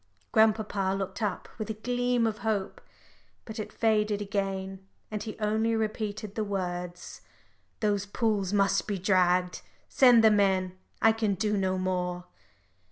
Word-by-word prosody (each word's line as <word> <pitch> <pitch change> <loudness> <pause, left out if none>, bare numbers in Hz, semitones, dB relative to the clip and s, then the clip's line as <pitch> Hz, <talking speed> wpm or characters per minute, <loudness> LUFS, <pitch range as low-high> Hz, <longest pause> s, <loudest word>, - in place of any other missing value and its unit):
Grandpapa 210 -3 +2
looked 195 +4 -5
up 205 -4 -2
with 215 - -4
a 220 - -3
gleam 245 +1 0
of 215 -1 -2
hope. 210 -3 -2 0.6
But 220 0 -7
it 215 - -5
faded 210 -2 +1
again, 195 -1 -3 0.3
and 210 -1 -3
he 215 0 -6
only 220 +1 +1
repeated 215 -1 -3
the 215 - -2
words 180 -3 -5 0.6
"Those 205 -2 0
pools 205 -3 0
must 200 -1 +2
be 205 -2 -1
dragged. 180 -1 +2 0.3
Send 245 -4 +6
the 220 - +7
men. 190 -3 +2 0.3
I 225 - +7
can 220 -3 0
do 210 +2 0
no 190 -1 0
more." 180 -1 -2
205 Hz, 145 wpm, -28 LUFS, 190-220 Hz, 0.6 s, the